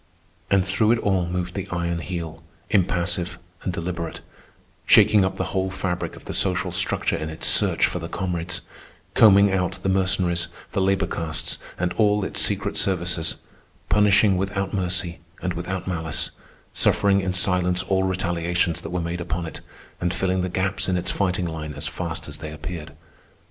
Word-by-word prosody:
And 95 -2 +3
through 110 +3 +3
it - - +1
all 95 -5 0
moved 90 0 -3
the 95 - -4
Iron 85 -1 -1
Heel, 80 -2 -5 0.3
impassive 90 -2 0 0.2
and 90 - -2
deliberate, 85 -1 -4 0.6
shaking 105 -2 +6
up 95 - -1
the - - -1
whole 95 0 0
fabric 95 -2 -3
of - - -14
the - - -5
social - - +2
structure - - +1
in 80 - -4
its 80 - -3
search - - +4
for - - -2
the - - -6
comrades, 90 -2 -2 0.5
combing 100 -2 +6
out 90 -2 0
the 95 - +1
Mercenaries, 95 -2 +1 0.2
the 100 - 0
labor 95 0 +2
castes, 80 -2 -2 0.2
and 90 0 -1
all 105 -2 +3
its - - +3
secret - - +1
services, 85 -3 +1 0.5
punishing 105 -1 +4
without 100 0 -2
mercy 90 -3 0 0.2
and 90 -1 -2
without 90 +2 -4
malice, 80 -5 -1 0.4
suffering 100 -1 +3
in 95 -1 -1
silence 90 0 +3
all 95 0 +1
retaliations 85 -2 0
that - - -7
were 90 0 -2
made 85 +1 -3
upon 85 0 -3
it, 80 - -8 0.4
and 90 +1 -1
filling 95 0 0
the 90 - -2
gaps 95 +2 -1
in 90 - +1
its 90 - -2
fighting 90 -2 0
line 80 -2 -5
as - - -1
fast - - -4
as 75 0 -7
they 80 -1 -6
appeared. 75 0 -7
90 Hz, 170 wpm, -23 LUFS, 85-95 Hz, 0.6 s, shaking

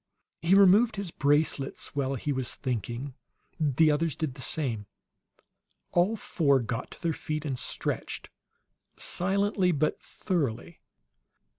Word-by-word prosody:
He 170 +4 +4
removed 200 +4 +6
his 200 -4 -4
bracelets 145 -2 0
while 135 -1 0
he 145 +3 -2
was 130 -2 -2
thinking; 125 +1 -3 0.5
the 155 +1 +4
others 155 0 0
did 155 -5 -2
the 130 - -10
same. 120 -10 -2 1.0
All 180 +6 +3
four 145 -9 +2
got 120 0 -3
to - - -13
their 165 -1 +1
feet 155 0 -4
and 135 -3 -1
stretched, - - -3 0.7
silently 195 0 +1
but 155 -1 0
thoroughly. 160 - -3
150 Hz, 125 wpm, -28 LUFS, 130-175 Hz, 1.0 s, removed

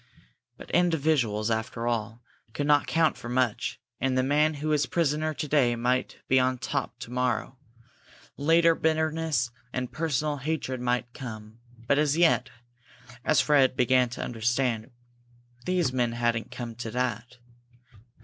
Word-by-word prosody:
But - - -11
individuals, 140 -11 +1
after 110 +1 -2
all, 115 0 -2 0.3
could 145 - -2
not 145 0 +3
count 165 -1 +2
for 120 - -8
much, 130 +1 0 0.2
and 130 -1 0
the 130 - +3
man 150 +3 +2
who 150 +2 -3
was 150 -3 +2
prisoner 155 -1 0
to 150 - -4
day 135 -5 +3
might 125 +2 -1
be 130 - +4
on 130 0 +1
top - - -3
to 115 - -8
morrow. 125 0 -1 0.8
Later 165 +3 +4
bitterness 160 -6 0 0.2
and 125 -1 -3
personal 150 -2 -1
hatred 135 -3 -3
might 120 -1 -1
come, 110 -4 -9 0.3
but 140 - +3
as 150 0 +2
yet, 165 -7 +3 0.7
as 155 - +4
Fred 140 -4 +3
began 125 0 +3
to 120 - -5
understand, 120 0 -1 0.8
these 175 -8 +1
men 120 -2 0
hadn't 120 -1 -1
come 120 -2 -6
to 120 -1 -5
that. 125 0 -3
130 Hz, 145 wpm, -27 LUFS, 120-150 Hz, 0.8 s, be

